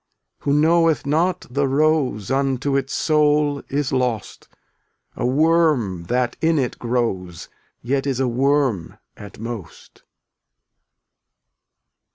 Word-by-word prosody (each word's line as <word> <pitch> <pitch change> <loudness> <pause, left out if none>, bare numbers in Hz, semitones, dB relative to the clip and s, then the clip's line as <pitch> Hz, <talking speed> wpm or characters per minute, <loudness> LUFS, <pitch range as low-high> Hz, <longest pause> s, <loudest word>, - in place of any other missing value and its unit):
Who 140 - 0
knoweth 160 +1 +3
not 170 +5 0
the 140 +3 0
rose 140 -7 +1
Unto 135 0 0
its 135 -1 -1
soul 150 -2 +2
is 140 -1 -1
lost 125 -5 -2 0.4
— - - -49 0.3
A - - -1
worm 145 - +2
that 125 +4 -1
in 165 0 +2
it 130 -4 -2
grows 105 -8 -3 0.3
Yet 135 +3 -1
is 135 -2 -1
a 130 - +1
worm 130 - 0 0.2
at 105 - -12
most. 110 -7 -9
135 Hz, 115 wpm, -21 LUFS, 120-150 Hz, 0.4 s, knoweth